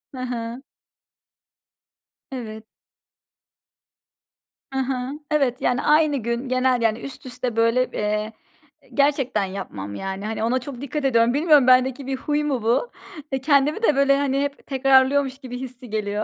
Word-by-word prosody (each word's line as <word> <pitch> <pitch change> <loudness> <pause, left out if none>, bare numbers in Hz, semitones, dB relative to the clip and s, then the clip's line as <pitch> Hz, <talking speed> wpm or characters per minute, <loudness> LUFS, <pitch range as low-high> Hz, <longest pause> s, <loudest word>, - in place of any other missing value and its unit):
Hı - - -7
hı. 245 0 -5 1.7
Evet. 220 -4 -7 2.1
Hı 265 - -2
hı. 260 0 -2 0.2
Evet 270 -3 +1
yani, 250 +1 +1
aynı 300 -1 +3
gün, 235 +2 -3
genel 255 -1 +2
yani 225 0 +1
üst 275 -1 -9
üste 245 -2 -4
böyle, 230 +2 +2
eee, 210 +1 -2 0.6
gerçekten 275 -7 +1
yapmam 105 - -6
yani 195 - -5
hani, 220 0 -3
ona 250 +3 +1
çok 260 -1 -8
dikkat 285 +1 -3
ediyorum. 235 -2 +3
Bilmiyorum 295 -3 +4
bendeki 255 +1 +3
bir 270 - -1
huy 295 +2 -1
mu 270 -6 -1
bu? 240 - +1 0.4
Eee, 265 -1 -1
kendimi 290 - +2
de 305 - +4
böyle 275 0 +4
hani 275 -1 0
hep 285 0 -4
tekrarlıyormuş 270 0 +3
gibi 250 -2 -8
hissi 250 -1 -9
geliyor. 210 0 -2
255 Hz, 145 wpm, -23 LUFS, 230-275 Hz, 2.1 s, Bilmiyorum